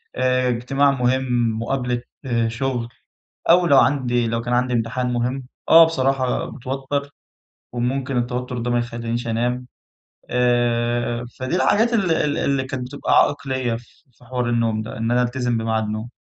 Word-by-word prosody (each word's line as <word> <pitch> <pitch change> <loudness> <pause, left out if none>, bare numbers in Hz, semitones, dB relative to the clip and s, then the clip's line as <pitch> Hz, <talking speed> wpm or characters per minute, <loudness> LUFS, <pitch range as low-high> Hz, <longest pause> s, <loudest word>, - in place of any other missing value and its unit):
آآ، 130 0 +2
اجتماع 135 +4 +2
مهم، 125 -3 +1
مقابلة 125 0 -1 0.5
شغل، 120 +1 -2 0.6
أو 175 +1 +6
لو 140 -5 +5
عندي 120 -4 +2
لو 115 0 -1
كان 120 +1 -2
عندي 125 +1 +1
امتحان 125 +2 -1
مهم، 125 +2 -1 0.3
آه 165 0 +9
بصراحة 135 -4 0
باتوتر 135 +2 -4 0.6
وممكن 130 +2 -1
التوتر 125 +1 -2
ده 120 +1 -2
ما 120 - +2
يخلينيش 120 0 -3
أنام 125 +2 -1 0.7
آآ، 120 -1 +1 0.2
فدي 130 +8 -1
الحاجات 225 +5 +3
ال 200 -6 +1
ال 150 -2 0
اللي 135 -1 0
كانت 130 -1 -5
بتبقى 145 +3 -3
عائق 145 -1 +1
ليَّ 130 -3 -1
ف - - -15 0.3
في 125 - -22
حوار 125 -1 -2
النوم 115 -2 +1
ده، 110 - -8
إن 115 +1 -1
أنا 125 +1 +3
ألتزم 120 -1 -1
بمعاد 110 -1 0
نوم. 110 +2 -4
125 Hz, 155 wpm, -21 LUFS, 120-130 Hz, 0.7 s, آه